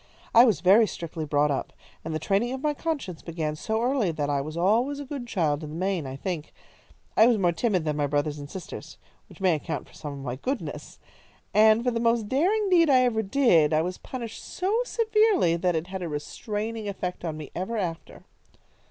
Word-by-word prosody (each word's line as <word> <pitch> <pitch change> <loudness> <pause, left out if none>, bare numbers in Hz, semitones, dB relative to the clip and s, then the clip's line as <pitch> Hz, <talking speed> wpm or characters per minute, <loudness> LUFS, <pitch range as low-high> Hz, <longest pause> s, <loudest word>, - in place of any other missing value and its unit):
"I 235 +2 +9
was 225 -5 +2
very 205 +5 +6
strictly 165 -3 -5
brought 145 0 +2
up, 135 - -3 0.3
and 160 - -5
the 155 - -1
training 205 +9 0
of 265 - -6
my 300 -1 +2
conscience 285 - -4
began 160 -2 -3
so 220 +8 -2
early 245 -8 +1
that 145 -2 -2
I 140 -1 +1
was 155 +3 -6
always 230 +11 +2
a 285 - -6
good 270 -3 -6
child 155 -8 0
in 150 - -6
the 155 - -7
main, 180 -4 -1
I 130 - -6
think. 160 +1 -5 0.6
I 220 - +7
was 240 -2 +4
more 180 -4 +2
timid 185 -2 0
than 150 -1 -1
my 145 -1 +1
brothers 145 +1 -1
and 145 0 -8
sisters, 185 +1 -8 0.3
which - - -15
may 185 -3 +3
account 150 - -4
for - - -20
some 145 -1 -7
of 140 -1 -8
my 125 0 -3
goodness, 265 - -5 0.6
and 220 +2 +5
for 250 - +1
the 230 - -1
most 230 -2 +1
daring 380 - +2
deed 335 -3 +5
I 260 -2 +6
ever 230 -3 +1
did, 195 - +3
I 155 +1 +3
was 180 +1 -4
punished 235 -4 -7
so 380 +4 -2
severely 430 - +3
that 175 0 0
it 160 +1 -1
had 190 +1 -6
a 175 - -3
restraining 210 +9 -4
effect 180 -3 -4
on 160 -3 -3
me 155 -2 -8
ever 190 +6 -3
after." 170 -5 -5
190 Hz, 215 wpm, -26 LUFS, 155-240 Hz, 0.6 s, I